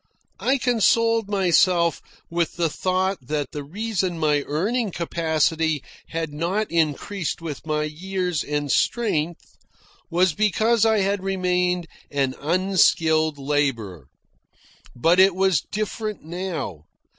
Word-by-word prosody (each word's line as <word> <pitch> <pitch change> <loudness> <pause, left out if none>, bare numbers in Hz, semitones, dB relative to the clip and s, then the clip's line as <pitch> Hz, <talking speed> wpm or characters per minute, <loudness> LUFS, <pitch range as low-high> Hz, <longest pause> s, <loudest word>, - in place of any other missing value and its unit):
I 270 +2 +2
consoled 230 -3 +2
myself 180 -3 +3 0.3
with 170 -1 -1
the 170 -2 0
thought 185 +2 0
that 145 +1 -3
the 145 - -5
reason 190 +2 -2
my 150 -2 +2
earning 210 - 0
capacity 160 -3 0 0.2
had 165 -2 -4
not 180 +7 -1
increased 165 +3 -1
with 160 -2 -7
my 150 0 0
years 180 +1 -2
and 145 -1 -2
strength 170 -9 -1 0.5
was 180 0 +2
because 215 +3 +2
I 220 -2 +3
had 200 0 0
remained 180 -2 0 0.2
an 135 -2 0
unskilled 160 -2 +2
labourer. 135 - -1 0.9
But 165 +8 +3
it 190 -1 +6
was 190 -5 +2
different 215 0 -3
now. 165 - -5
175 Hz, 115 wpm, -23 LUFS, 150-195 Hz, 0.9 s, it